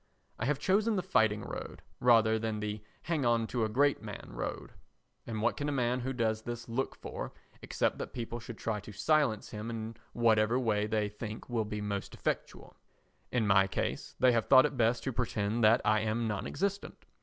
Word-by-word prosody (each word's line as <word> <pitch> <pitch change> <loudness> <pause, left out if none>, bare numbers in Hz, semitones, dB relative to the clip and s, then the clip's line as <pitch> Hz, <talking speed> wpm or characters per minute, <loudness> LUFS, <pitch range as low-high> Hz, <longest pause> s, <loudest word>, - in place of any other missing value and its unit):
I 110 - -1
have 145 +2 +1
chosen 205 +8 +2
the 185 - 0
fighting 110 - +2
road - - -7 0.2
rather 110 -2 +5
than 110 -1 -2
the 105 0 -3 0.2
hang 160 -4 0
on 120 -1 +3
to 120 0 -1
a 110 - 0
great 140 +4 +2
man 105 -2 -8
road, - - -5 0.6
and 110 -2 -3
what 120 - +2
can 145 0 -2
a - - 0
man 125 -2 +1
who 130 +2 -2
does 110 -3 0
this 120 +1 -6
look 120 +3 -2
for - - -6 0.3
except - - -1
that - - -5
people 120 -1 -5
should 115 -1 -8
try 110 -2 -2
to 105 +2 -10
silence 110 +1 +1
him 105 +1 -5
in 115 -1 -5 0.2
whatever 115 0 +3
way 105 -4 +1
they 110 -1 0
think 105 +3 -7
will 115 -2 0
be 105 0 -4
most 100 -1 -4
effectual? - - -4 0.6
In 120 -3 +1
my 95 -1 +5
case - - -3
they 130 0 +6
have 115 -2 +1
thought 130 0 +8
it 145 -1 -2
best 115 -1 +2
to 135 - -2
pretend 115 -1 -1
that 110 +2 +6
I 110 -2 +4
am 110 +2 0
non 105 -2 -2
existent. 200 +1 -3
115 Hz, 200 wpm, -31 LUFS, 110-125 Hz, 0.6 s, thought